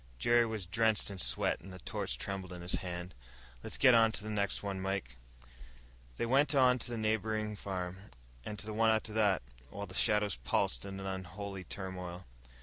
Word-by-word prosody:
Jerry 120 - +4
was 110 -4 -3
drenched 110 +2 +2
in 95 - -7
sweat - - +1
and 95 +3 -11
the 95 - -8
torch - - -3
trembled 95 -2 -4
in 90 -1 -8
his 90 - -1
hand. 90 -1 -5 0.5
"Let's - - -4
get 125 - +7
on 115 -1 +6
to 105 - -3
the 110 - -4
next 100 -1 0
one, 100 -2 -3
Mike." 95 -10 -2 1.0
They - - 0
went 135 +4 +3
on 130 -2 +5
to - - -2
the 120 - -3
neighboring 110 -1 0
farm, 95 -2 -4 0.5
and 105 - -5
to 105 - -5
the 110 - -4
one 115 +1 +4
after 110 -1 +1
that, 105 - +3 0.3
while 100 +1 -5
the 95 - -11
shadows 105 - +2
pulsed - - 0
in 95 0 -6
an 95 - -6
unholy 95 +1 -5
turmoil. 90 -1 -6
100 Hz, 195 wpm, -33 LUFS, 95-110 Hz, 1.0 s, get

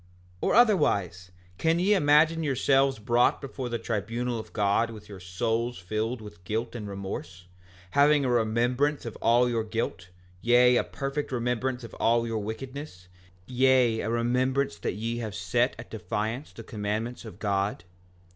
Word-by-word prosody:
5:18 - - 0
Or - - +2
otherwise, 100 - +3 0.3
can 165 +1 +2
ye 190 +4 +3
imagine 160 -1 +4
yourselves 135 -2 +2
brought 120 +3 +2
before 130 -2 -6
the 120 - -1
tribunal 115 +2 -2
of 110 - -9
God 105 +2 +1
with 105 -2 -10
your 100 -2 -10
souls 115 +7 -2
filled 110 +6 -3
with 105 -5 -12
guilt 110 +5 -3
and 110 -4 -6
remorse, 95 -2 -6 0.5
having 145 0 +4
a - - +1
remembrance 120 +5 +1
of 115 - -6
all 120 +2 +4
your 115 -2 0
guilt, 110 -5 -4 0.3
yea, 125 +1 +5
a - - +2
perfect 140 +1 -4
remembrance 125 +1 -1
of 115 - -9
all 115 0 +3
your 115 -1 -2
wickedness, 110 -3 -7 0.4
yea, 125 -2 +3
a - - -2
remembrance 125 -1 0
that - - -2
ye 115 +4 -3
have 110 -4 -5
set - - 0
at - - -11
defiance 110 +8 -3
the 115 - -10
commandments 110 +2 -4
of 110 -6 -10
God? 100 -3 -1
115 Hz, 160 wpm, -27 LUFS, 105-130 Hz, 0.5 s, yea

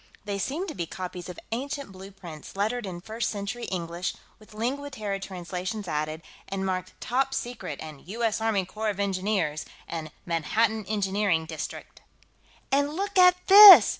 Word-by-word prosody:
They 200 -1 -2
seemed 310 - -2
to - - -5
be 170 -2 -4
copies 180 0 -6
of 180 - -8
ancient 275 +1 -3
blueprints, 190 -5 -10
lettered 215 +3 -1
in 175 -2 -6
First 220 +4 -2
Century 205 +3 -4
English, 175 -1 -3 0.2
with 215 0 -17
Lingua 270 +6 -2
Terra 210 -7 -3
translations 185 +2 -5
added, 155 +1 -2 0.3
and 195 0 -2
marked 185 -1 -3
TOP 270 +2 0
SECRET 240 - -4
and 155 -1 -10
U.S. 225 +2 -1
ARMY 215 -4 +1
CORPS 215 +2 -2
OF - - -12
ENGINEERS 190 -6 0 0.2
and 160 -2 -5 0.2
MANHATTAN 215 +6 +1
ENGINEERING 195 -5 +1
DISTRICT. 160 -1 -7 0.7
"And 285 +2 +2
look 400 +2 -3
at 360 0 +6
this!" 400 0 +12
200 Hz, 155 wpm, -27 LUFS, 180-235 Hz, 0.7 s, this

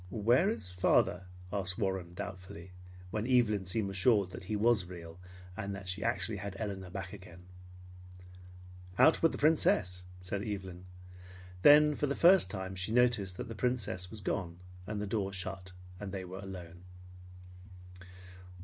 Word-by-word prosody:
"Where 120 - +3
is 215 - -4
father?" 90 0 +2 0.3
asked 95 -2 0
Warren 95 -5 -2
doubtfully, 95 -2 -8 0.4
when 110 +2 -2
Evelyn 110 -7 +2
seemed 100 0 -1
assured 100 -1 +2
that 90 +1 -9
he 105 - -2
was 105 -2 +3
real, 85 -1 -10 0.4
and 100 +1 -4
that 100 -1 -9
she 95 +3 -3
actually 115 -2 -1
had 100 0 -6
Elinor 100 -4 -5
back 95 0 -6
again. 90 -3 -12 1.5
"Out 160 - +5
with 165 - +4
the - - -5
Princess," 95 - +2
said 90 +2 -4
Evelyn. 95 -4 -6 0.8
Then 150 +3 +7
for 145 - -1
the 140 - -1
first 185 +2 +6
time 95 -2 -5
she 95 +3 -3
noticed 115 -6 +2
that - - -5
the 115 - -6
Princess 100 -6 -1
was 110 0 -8
gone, 85 -3 -3 0.3
and 105 -1 -3
the 105 - -2
door 100 -1 -2
shut, 95 0 -5 0.3
and 100 -2 -6
they 95 -1 -5
were 95 +2 -8
alone. 90 -3 -9
100 Hz, 155 wpm, -32 LUFS, 90-110 Hz, 1.5 s, Then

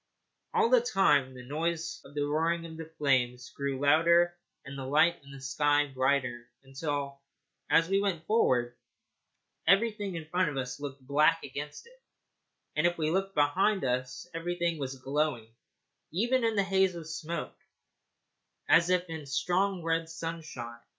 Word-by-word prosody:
All 455 0 +3
the - - +6
time 145 - +2
the 125 0 -10
noise 160 +4 -2
of 140 - -15
the 145 -1 0
roaring 165 +3 0
of 160 -1 -9
the 160 0 -9
flames 125 -3 +1
grew 140 -1 -3
louder 170 +4 +4 0.3
and 135 - -8
the 135 - -5
light 155 +6 +3
in 140 - -15
the 135 - -10
sky 145 +2 +2
brighter, 130 -3 0
until, 140 0 -4 0.5
as 165 0 +4
we 195 +2 +2
went 175 -5 -1
forward, 125 - +2 0.9
everything 205 0 +2
in 165 -2 -5
front 180 0 +1
of 140 - -5
us 125 0 -4
looked 140 -2 -7
black 150 +4 +3
against 145 +2 -7
it, - - -20 0.7
and 155 +3 +3
if 175 - -2
we 155 -1 0
looked 195 +2 -1
behind 185 +8 +2
us 125 +5 -2
everything 170 0 -2
was 135 -1 -4
glowing, 135 -4 -2 0.6
even 240 +8 +1
in 225 -1 +1
the 200 - +3
haze 190 -1 +2
of 165 -2 -7
smoke, 165 +1 -5 1.1
as 170 +1 +5
if 180 0 +2
in 160 -3 -7
strong 180 +6 0
red 165 0 0
sunshine. 160 -8 -6
155 Hz, 155 wpm, -30 LUFS, 140-175 Hz, 1.1 s, the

